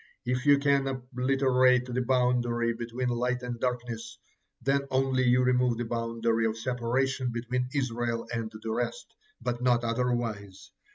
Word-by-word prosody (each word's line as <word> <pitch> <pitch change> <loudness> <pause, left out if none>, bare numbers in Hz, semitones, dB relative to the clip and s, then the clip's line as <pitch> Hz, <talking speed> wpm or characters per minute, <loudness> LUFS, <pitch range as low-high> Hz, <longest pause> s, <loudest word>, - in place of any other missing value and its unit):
If 125 +3 -1
you 145 0 +7
can 140 -1 +2
obliterate 130 0 +2
the 125 0 -2
boundary 120 -2 +1
between 120 +2 -3
light 125 +1 -1
and 120 -1 -4
darkness, 120 -2 -3 0.4
then 140 +1 +1
only 130 0 +1
you 125 0 +4
remove 125 -1 +2
the 120 - -2
boundary 115 0 0
of 110 0 -3
separation 125 +2 -1
between 125 +2 -2
Israel 120 -4 -2
and 115 -1 -3
the 110 - -3
rest, - - -3 0.3
but 120 0 -3
not 120 -1 +3
otherwise. 115 -5 -2
125 Hz, 145 wpm, -28 LUFS, 115-130 Hz, 0.4 s, you